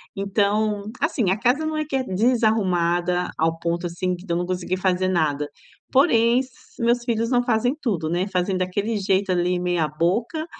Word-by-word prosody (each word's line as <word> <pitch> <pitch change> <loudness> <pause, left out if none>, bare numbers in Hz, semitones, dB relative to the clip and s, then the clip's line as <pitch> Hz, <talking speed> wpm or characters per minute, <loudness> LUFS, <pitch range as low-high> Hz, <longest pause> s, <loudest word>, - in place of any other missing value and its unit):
Então, 205 +1 0 0.2
assim, 245 - +1
a 205 - 0
casa 255 +6 +2
não 315 0 -2
é 310 0 -1
que 280 - -4
é 265 - +1
desarrumada 185 -6 +1
ao 165 +1 0
ponto 170 +1 -2
assim 180 +2 -2
que 175 - -13
de 180 - -6
eu - - +1
não 175 - -1
consegui 185 0 -2
fazer 185 0 +1
nada. 150 -5 0 0.4
Porém, 240 -4 +4
s 260 0 -5 0.3
meus 235 0 +2
filhos 230 -1 -1
não 245 -1 +4
fazem 245 +2 +1
tudo, 175 - -1
né, 180 +4 0
fazem 185 0 -1
daquele 205 +4 -1
jeito 195 0 +1
ali 180 0 +1
meia 175 -3 0
boca 190 - -1
195 Hz, 185 wpm, -23 LUFS, 180-230 Hz, 0.4 s, Porém